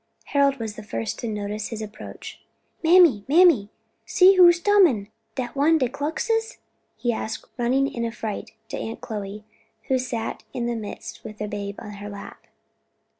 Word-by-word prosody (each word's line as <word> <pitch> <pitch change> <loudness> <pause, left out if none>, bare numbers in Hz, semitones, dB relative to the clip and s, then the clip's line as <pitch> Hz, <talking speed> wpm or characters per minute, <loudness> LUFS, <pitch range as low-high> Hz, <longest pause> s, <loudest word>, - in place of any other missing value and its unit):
Harold 280 -1 +3
was 220 -3 -5
the - - -8
first 115 - -4
to 235 - -4
notice 210 0 -3
his 225 - -6
approach. 215 0 -9 0.4
"Mammy, 325 - +6
mammy! 305 - +5 0.3
see 385 0 +6
who's 350 -1 +7
tumin! 340 - +4 0.3
dat 250 -1 -4
one 305 +4 +4
de 260 -5 +1
Kluxes?" 450 - -2 0.4
he 240 -1 0
asked, 220 0 -4
running 255 +2 +2
in 235 -3 -4
affright 225 -2 -4 0.2
to - - -4
Aunt 225 - -5
Chloe, 210 -2 -6 0.4
who 260 -1 +3
sat 235 -3 -4
in 240 - -2
their 240 0 -1
midst 215 -3 -7
with 215 -1 -9
the 210 - -3
babe 200 -1 -5
on 210 - -8
her 205 - -6
lap. 200 -1 -10
235 Hz, 165 wpm, -24 LUFS, 210-295 Hz, 0.4 s, who's